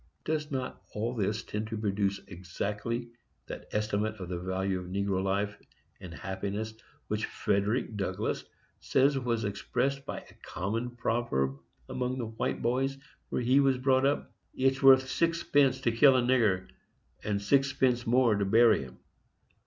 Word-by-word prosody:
Does 150 Hz, -1 st, -1 dB
not 130 Hz, -3 st, -4 dB
all 115 Hz, +3 st, -1 dB
this 110 Hz, -1 st, -1 dB
tend 105 Hz, +1 st, -4 dB
to 110 Hz, 0 st, -4 dB
produce 100 Hz, -2 st, 0 dB
exactly 105 Hz, +6 st, -4 dB, 0.4 s
that -, -, -8 dB
estimate 105 Hz, 0 st, -1 dB
of 90 Hz, -4 st, -8 dB
the 90 Hz, -1 st, -3 dB
value 95 Hz, +1 st, -1 dB
of 90 Hz, -, -8 dB
negro 100 Hz, 0 st, -1 dB
life 100 Hz, +2 st, -1 dB, 0.4 s
and 90 Hz, -, -9 dB
happiness 100 Hz, +5 st, -4 dB, 0.3 s
which -, -, -1 dB
Frederic 105 Hz, +4 st, 0 dB
Douglass 100 Hz, -1 st, -2 dB, 0.4 s
says 135 Hz, +1 st, +2 dB
was 120 Hz, -3 st, -1 dB
expressed 125 Hz, +7 st, -1 dB
by -, -, -4 dB
a -, -, -18 dB
common 115 Hz, +6 st, -3 dB
proverb 70 Hz, -, -1 dB, 0.3 s
among 125 Hz, 0 st, -2 dB
the 120 Hz, -, -2 dB
white 110 Hz, 0 st, -3 dB
boys 135 Hz, +3 st, 0 dB, 0.3 s
where -, -, -1 dB
he 130 Hz, +4 st, +4 dB
was 135 Hz, -2 st, +3 dB
brought 130 Hz, +1 st, +3 dB
up: 145 Hz, -, -1 dB, 0.2 s
"It's 135 Hz, +1 st, +1 dB
worth 130 Hz, -1 st, +7 dB
sixpence 145 Hz, -4 st, +2 dB
to 120 Hz, -, +2 dB
kill 130 Hz, +4 st, +6 dB
a -, -, +3 dB
nigger, 110 Hz, -7 st, +2 dB, 0.6 s
and 105 Hz, -1 st, -1 dB
sixpence 130 Hz, +1 st, +2 dB
more 120 Hz, -1 st, +4 dB
to 100 Hz, -1 st, 0 dB
bury 110 Hz, +3 st, +5 dB
him"? 65 Hz, -2 st, -10 dB
115 Hz, 155 wpm, -30 LUFS, 100-130 Hz, 0.6 s, worth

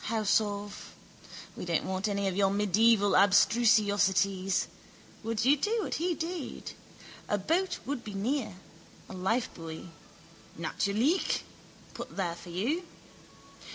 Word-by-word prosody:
House 220 Hz, -1 st, +2 dB
of... 205 Hz, -1 st, -6 dB, 0.6 s
We -, -, -6 dB
don't 170 Hz, -3 st, 0 dB
want 190 Hz, +2 st, -1 dB
any 200 Hz, -1 st, -1 dB
of 190 Hz, -, -1 dB
your 195 Hz, -1 st, +3 dB
medieval 205 Hz, +1 st, +3 dB
abstrusiosities. 200 Hz, -2 st, +3 dB, 0.6 s
Would 225 Hz, 0 st, -2 dB
you 275 Hz, +3 st, +6 dB
do 425 Hz, +10 st, 0 dB
what -, -, -3 dB
he 345 Hz, +1 st, 0 dB
did? 330 Hz, -2 st, -5 dB, 0.6 s
A 205 Hz, -, +2 dB
boat 340 Hz, -, 0 dB
would 270 Hz, -3 st, -3 dB
be 210 Hz, -2 st, -7 dB
near, 220 Hz, 0 st, -1 dB, 0.5 s
a -, -, -9 dB
lifebuoy. 180 Hz, -5 st, -3 dB, 0.7 s
Natürlich, 235 Hz, -, +1 dB, 0.5 s
put -, -, -8 dB
there 180 Hz, -4 st, -1 dB
for 175 Hz, +1 st, -11 dB
you. 240 Hz, -, -1 dB
205 Hz, 120 wpm, -30 LUFS, 195-240 Hz, 0.7 s, you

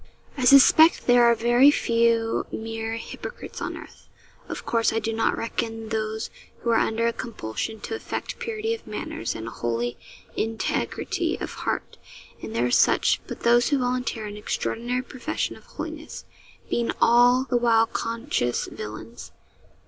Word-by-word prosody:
I 255 Hz, -, -1 dB
suspect 275 Hz, +5 st, +7 dB
there 245 Hz, -1 st, +6 dB
are 235 Hz, 0 st, +5 dB
very 240 Hz, +4 st, +5 dB
few 230 Hz, -4 st, +2 dB
mere 225 Hz, 0 st, -4 dB
hypocrites 230 Hz, -, -8 dB
on -, -, -3 dB
earth. -, -, -13 dB, 0.4 s
Of -, -, -6 dB
course, 230 Hz, -1 st, +2 dB
I 225 Hz, -, -1 dB
do 225 Hz, 0 st, -1 dB
not 225 Hz, -, +1 dB
reckon 225 Hz, -1 st, -3 dB
those 220 Hz, 0 st, -3 dB, 0.3 s
who 235 Hz, -, 0 dB
are 225 Hz, -, +4 dB
under 230 Hz, +1 st, +1 dB
compulsion 220 Hz, -, -5 dB
to -, -, -5 dB
affect 445 Hz, -, -5 dB
purity 450 Hz, -1 st, -2 dB
of 455 Hz, -, -8 dB
manners 210 Hz, -, -4 dB
and 110 Hz, 0 st, -6 dB
a -, -, -5 dB
holy 120 Hz, +1 st, -2 dB, 0.4 s
integrity 220 Hz, -, -1 dB
of -, -, -5 dB
heart -, -, -4 dB, 0.4 s
and 110 Hz, 0 st, -7 dB
there 120 Hz, +1 st, +2 dB
are 125 Hz, -, 0 dB
such -, -, +3 dB
but -, -, -7 dB
those 240 Hz, +1 st, +4 dB
who 285 Hz, -, +2 dB
volunteer 250 Hz, -3 st, -1 dB
an 205 Hz, 0 st, -7 dB
extraordinary 240 Hz, +4 st, -2 dB
profession 260 Hz, +4 st, -3 dB
of -, -, -17 dB
holiness, -, -, -7 dB, 0.4 s
being 235 Hz, -1 st, -1 dB
all 245 Hz, +2 st, +5 dB
the 255 Hz, -2 st, 0 dB
while 230 Hz, -1 st, +4 dB
conscious 230 Hz, -, -2 dB
villains. 110 Hz, +2 st, -8 dB
230 Hz, 155 wpm, -25 LUFS, 220-245 Hz, 0.4 s, suspect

